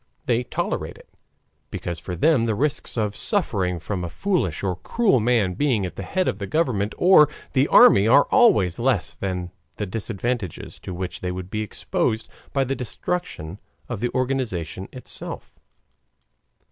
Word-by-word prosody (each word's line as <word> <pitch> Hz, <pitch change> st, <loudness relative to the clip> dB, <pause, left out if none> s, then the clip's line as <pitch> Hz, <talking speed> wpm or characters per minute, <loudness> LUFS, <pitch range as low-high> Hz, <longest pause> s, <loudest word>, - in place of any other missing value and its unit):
They 120 Hz, 0 st, +2 dB
tolerate -, -, -3 dB
it, -, -, -17 dB, 0.6 s
because 85 Hz, -2 st, -5 dB
for 90 Hz, -, -5 dB
them 120 Hz, -, +3 dB
the 110 Hz, -, +1 dB
risks 140 Hz, +1 st, -1 dB
of 105 Hz, -2 st, 0 dB
suffering 100 Hz, -, 0 dB
from 90 Hz, +2 st, -4 dB
a 85 Hz, -, -3 dB
foolish 170 Hz, -, -1 dB
or 95 Hz, -3 st, -1 dB
cruel 200 Hz, -, +2 dB
man 110 Hz, -5 st, +2 dB
being 120 Hz, -3 st, +1 dB
at 90 Hz, -, -6 dB
the -, -, -5 dB
head 185 Hz, -, -1 dB
of -, -, -1 dB
the 100 Hz, -, -4 dB
government 115 Hz, -, 0 dB
or 175 Hz, -4 st, +6 dB, 0.2 s
the 135 Hz, +1 st, +3 dB
army 100 Hz, +2 st, +7 dB
are 140 Hz, +5 st, +7 dB
always 105 Hz, -, +4 dB
less 105 Hz, -, +1 dB
than 90 Hz, +1 st, -4 dB, 0.2 s
the 105 Hz, -, -3 dB
disadvantages 110 Hz, 0 st, -4 dB
to 90 Hz, -, -7 dB
which 90 Hz, 0 st, -5 dB
they 90 Hz, -, -2 dB
would 90 Hz, +1 st, -6 dB
be 110 Hz, -, -1 dB
exposed 110 Hz, +1 st, -2 dB, 0.2 s
by 135 Hz, -1 st, +1 dB
the 135 Hz, +1 st, -2 dB
destruction 120 Hz, -, -4 dB, 0.3 s
of 120 Hz, -5 st, -4 dB
the 120 Hz, +2 st, 0 dB
organization 110 Hz, -10 st, -2 dB
itself. 130 Hz, -, -7 dB
110 Hz, 160 wpm, -23 LUFS, 90-130 Hz, 0.6 s, army